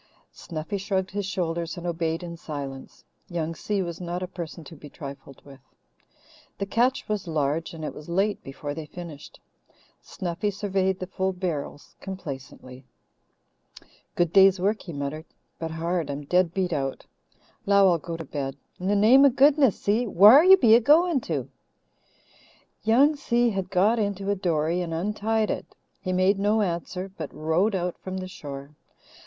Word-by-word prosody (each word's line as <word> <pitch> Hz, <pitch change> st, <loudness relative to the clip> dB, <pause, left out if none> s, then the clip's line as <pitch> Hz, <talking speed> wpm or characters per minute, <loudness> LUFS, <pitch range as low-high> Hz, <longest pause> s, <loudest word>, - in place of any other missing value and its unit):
Snuffy 165 Hz, +5 st, -5 dB
shrugged 190 Hz, -1 st, -2 dB
his 200 Hz, -1 st, -3 dB
shoulders 170 Hz, -2 st, -3 dB
and 175 Hz, -, -7 dB
obeyed 165 Hz, 0 st, -2 dB
in 170 Hz, -1 st, -6 dB
silence. 140 Hz, -5 st, -8 dB, 0.3 s
Young 165 Hz, -2 st, -2 dB
Si 195 Hz, +5 st, -2 dB
was 170 Hz, 0 st, -6 dB
not 175 Hz, +1 st, -4 dB
a -, -, -3 dB
person 170 Hz, -2 st, -7 dB
to 165 Hz, -, -12 dB
be 145 Hz, 0 st, -12 dB
trifled 140 Hz, -1 st, -10 dB
with. 135 Hz, -2 st, -13 dB, 1.0 s
The 200 Hz, -, -2 dB
catch 245 Hz, +6 st, +1 dB
was 210 Hz, -4 st, -3 dB
large 155 Hz, 0 st, -1 dB
and 160 Hz, -1 st, -6 dB
it -, -, -4 dB
was 150 Hz, +2 st, -11 dB
late 195 Hz, +4 st, 0 dB
before 145 Hz, +2 st, -6 dB
they 155 Hz, 0 st, -7 dB
finished. 160 Hz, -2 st, -10 dB, 0.6 s
Snuffy 185 Hz, +1 st, -3 dB
surveyed 190 Hz, -2 st, -1 dB
the 185 Hz, -, -5 dB
full 190 Hz, 0 st, -2 dB
barrels 170 Hz, -6 st, -5 dB
complacently. 140 Hz, -8 st, -8 dB, 1.3 s
"Good 175 Hz, -1 st, +1 dB
day's 195 Hz, -1 st, +6 dB
work," 205 Hz, +4 st, 0 dB
he 175 Hz, -, -8 dB
muttered, 145 Hz, +2 st, -5 dB, 0.3 s
"but 165 Hz, -, -3 dB
hard 165 Hz, -1 st, -2 dB
I'm 140 Hz, +1 st, -4 dB
dead 180 Hz, +2 st, +2 dB
beat 180 Hz, -1 st, -1 dB
out. 135 Hz, -3 st, -3 dB, 0.6 s
'Low 200 Hz, -2 st, +6 dB
I'll 170 Hz, -, +1 dB
go 165 Hz, +2 st, -6 dB
to 165 Hz, -, -7 dB
bed. 135 Hz, -1 st, -4 dB, 0.2 s
In 180 Hz, -, -4 dB
the 205 Hz, -, +2 dB
name 230 Hz, +7 st, +6 dB
o' 280 Hz, -, +8 dB
goodness, 275 Hz, -2 st, +4 dB
Si, 225 Hz, +4 st, +1 dB
whar 215 Hz, -, +8 dB
be 240 Hz, -, +3 dB
you 225 Hz, -, +9 dB
a -, -, +3 dB
goin' 300 Hz, +4 st, +4 dB
to?" 145 Hz, -, -3 dB, 1.3 s
Young 265 Hz, +8 st, +4 dB
Si 240 Hz, -4 st, +1 dB
had 195 Hz, -2 st, -3 dB
got 200 Hz, +5 st, +3 dB
into 200 Hz, -1 st, -1 dB
a -, -, +1 dB
dory 170 Hz, -2 st, 0 dB
and 165 Hz, -2 st, -3 dB
untied 210 Hz, +4 st, 0 dB
it. -, -, -6 dB, 0.3 s
He 185 Hz, -2 st, -3 dB
made 185 Hz, +2 st, +2 dB
no 210 Hz, +2 st, +2 dB
answer, 180 Hz, +1 st, -4 dB
but 155 Hz, -5 st, -6 dB
rowed 170 Hz, +7 st, 0 dB
out 180 Hz, -1 st, -2 dB
from 185 Hz, 0 st, -6 dB
the 185 Hz, 0 st, -5 dB
shore. 140 Hz, -4 st, -9 dB
180 Hz, 170 wpm, -25 LUFS, 160-200 Hz, 1.3 s, you